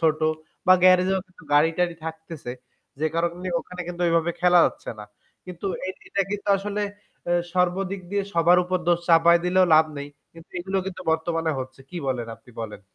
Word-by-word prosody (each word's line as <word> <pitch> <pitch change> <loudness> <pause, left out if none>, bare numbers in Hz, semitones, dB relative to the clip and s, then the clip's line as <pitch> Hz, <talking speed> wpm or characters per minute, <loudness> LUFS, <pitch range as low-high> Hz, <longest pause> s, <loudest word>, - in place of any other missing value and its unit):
ছোট 160 -1 +2 0.5
বা 185 - +8
গ্যারেজেও 185 +1 +5 0.4
গাড়ি-টাড়ি 165 +3 +3
থাকতেছে। 160 -5 -7 0.5
যে 155 - +2
কারণে 170 +2 -1
ওখানে 180 0 -10
কিন্তু 175 0 -6
ঐভাবে 165 0 +2
খেলা 180 0 +5
যাচ্ছে - - -6
না। 105 - -7 0.4
কিন্তু 180 +2 -6 0.2
এই 190 - -3 0.2
এটা 200 - +1
কিন্তু 205 0 -4
আসলে 205 +1 -3 0.5
এ - - +4 0.2
সর্বদিক 185 +2 0
দিয়ে 200 0 0
সবার 170 +2 +5
উপর 185 +1 0
দোষ 170 0 +4
চাপাই 170 +1 +6
দিলেও 185 +1 +4
লাভ 160 +1 +7
নেই। 145 0 -6 0.2
কিন্তু 165 0 -15
এগুলো 190 +2 -2
কিন্তু 185 -1 -6
বর্তমানে 165 0 0
হচ্ছে। 130 +1 -7
কি 180 - -7
বলেন 125 -3 -1
আপনি 115 +2 -20
বলেন? 110 -2 -6
175 Hz, 170 wpm, -24 LUFS, 160-185 Hz, 0.5 s, বা